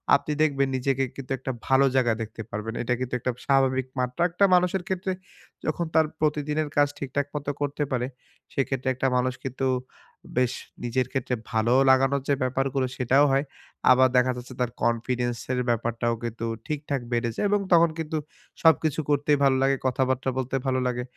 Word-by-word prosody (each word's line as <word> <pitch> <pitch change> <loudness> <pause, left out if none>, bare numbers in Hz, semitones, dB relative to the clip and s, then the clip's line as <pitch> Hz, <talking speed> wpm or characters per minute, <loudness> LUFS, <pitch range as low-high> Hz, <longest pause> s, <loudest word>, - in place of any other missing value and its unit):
আপনি 140 - -1
দেখবেন 140 -3 +2
নিজেকে 135 +1 0
কিন্তু 135 -1 -8
একটা 130 - -3 0.2
ভালো 135 +1 +5
জায়গায় 120 -4 +3
দেখতে 115 +1 -8
পারবেন। 105 +2 -4
এটা 125 - 0
কিন্তু 130 -1 -4
একটা 125 - -1
স্বাভাবিক 130 -1 +2
মাত্রা 125 +6 0
একটা 180 +4 +3
মানুষের 180 +1 +2
ক্ষেত্রে 190 0 -2 0.5
যখন 165 +2 -1
তার 160 0 +6
প্রতিদিনের 150 0 0
কাজ 145 0 +5
ঠিকঠাক 140 +1 -2
মতো 145 -1 -2
করতে 145 +1 -1
পারে, 125 -1 0 0.5
সেক্ষেত্রে 135 -1 -1
একটা 130 +1 0
মানুষ 125 0 +1
কিন্তু 135 +1 -2 0.7
বেশ 125 -1 +2 0.3
নিজের 125 +1 0
ক্ষেত্রে 130 -2 -1 0.2
ভালো 115 +2 +2 0.2
লাগানোর 135 +1 +4
যে - - +5
ব্যাপারগুলো 135 +1 0
সেটাও 130 +3 +4
হয়। 135 +2 +2 0.5
আবার 130 +1 +6
দেখা 125 0 +4
যাচ্ছে 125 +1 -9
তার 125 -1 0
confidence 120 +1 0
এর 125 - 0
ব্যাপারটাও 115 0 0
কিন্তু 115 0 -4 0.2
ঠিকঠাক 145 -3 -2
বেড়ে 120 0 +1
যায় - - -1
এবং 205 0 +3
তখন 170 0 +6
কিন্তু 160 0 -2 0.5
সবকিছু 160 -2 +4
করতেই 145 0 +3
ভালো 135 -1 +4
লাগে, 135 0 +3
কথাবার্তা 130 0 0
বলতে 130 0 -2
ভালো 130 0 +1
লাগে। 125 0 -2
130 Hz, 170 wpm, -26 LUFS, 125-145 Hz, 0.7 s, তার